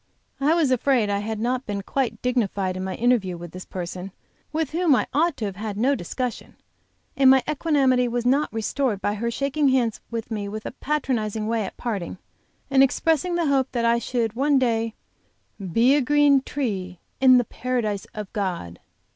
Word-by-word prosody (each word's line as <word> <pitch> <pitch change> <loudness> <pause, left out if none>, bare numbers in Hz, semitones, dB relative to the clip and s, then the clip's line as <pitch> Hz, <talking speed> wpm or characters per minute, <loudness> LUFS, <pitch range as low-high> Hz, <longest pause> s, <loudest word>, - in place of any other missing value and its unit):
I 295 +4 +3
was 315 -6 +2
afraid 250 -4 +2
I 200 - 0
had 215 +1 -4
not 250 +3 -1
been 200 -1 -3
quite 265 +3 -2
dignified 200 -7 0
in 185 - -4
my 190 0 -3
interview 225 -7 +1
with 170 -1 -9
this 185 0 -9
person, 180 +1 -6 0.4
with 315 -1 -1
whom 330 -3 +3
I - - +1
ought 325 +2 +2
to 220 - -3
have 195 -2 -5
had 210 -1 -4
no 255 +6 +3
discussion, 250 +2 -4 0.6
and 270 -1 +5
my 265 -1 +6
equanimity 275 -5 +2
was 240 0 -2
not 275 +4 +2
restored 225 0 -1
by 205 - -1
her 230 +3 -2
shaking 275 +4 +1
hands 245 -4 +1
with 230 -1 -5
me 210 -2 -3
a 215 +2 -5
patronizing 240 -7 -2
way 225 -1 0
at - - -8
parting, 200 -8 -4 0.5
and 270 -1 +5
expressing 325 +5 +2
the 340 -1 +1
hope 275 -2 +1
that 235 -2 0
I 235 0 +3
should 235 -2 -1
one 280 +4 +2
day 230 -3 0 0.6
"be 230 +8 +3
a 295 - +3
green 290 0 +4
tree 195 -11 -3 0.2
in 255 -1 +7
the 245 - +2
Paradise 225 -5 -2
of 210 -2 -7
God." 175 - -3
240 Hz, 185 wpm, -24 LUFS, 205-270 Hz, 0.6 s, in